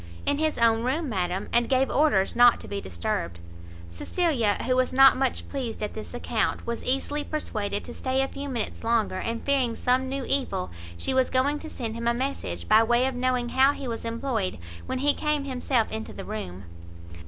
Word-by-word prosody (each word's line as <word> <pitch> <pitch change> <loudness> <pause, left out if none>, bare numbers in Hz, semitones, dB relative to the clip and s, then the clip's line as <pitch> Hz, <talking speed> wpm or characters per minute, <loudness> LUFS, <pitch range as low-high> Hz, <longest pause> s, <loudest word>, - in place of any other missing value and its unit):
"In 285 0 +1
his 315 -1 0
own 230 -1 +4
room, 275 +5 -1
madam, 185 -3 -2
and 235 0 +3
gave 265 0 +2
orders 255 -10 +2
not 240 0 +6
to - - -8
be 200 0 -4
disturbed." 85 -1 -3 0.5
Cecilia, 235 - +1
who 255 0 +2
was 255 0 +2
not 270 +1 +7
much 265 -1 -1
pleased 245 -6 -4
at 210 - -3
this 220 +2 -8
account, 235 -2 -1
was 235 0 -3
easily 280 +3 -1
persuaded 210 -10 -3
to 240 - -8
stay 265 0 0
a - - -1
few 280 +1 -6
minutes 240 -5 -4
longer; 225 -4 +1
and, 230 0 -3
fearing 265 -5 +1
some 260 +1 +1
new 270 0 -3
evil, 255 -9 -1 0.3
she 175 - -1
was 260 -1 +3
going 280 +3 +1
to 315 - -8
send 230 -6 -4
him 230 +1 -3
a 235 - +3
message, 95 - -3
by 220 - +6
way 240 +2 +3
of 265 - 0
knowing 250 -1 0
how 265 +3 +4
he 275 - -6
was 230 -1 -4
employed, 230 -4 -2 0.3
when 260 - -2
he 285 +2 +3
came 300 -2 0
himself 255 -3 0
into 220 0 -5
the - - -8
room. 95 - -6
245 Hz, 200 wpm, -26 LUFS, 220-270 Hz, 0.5 s, not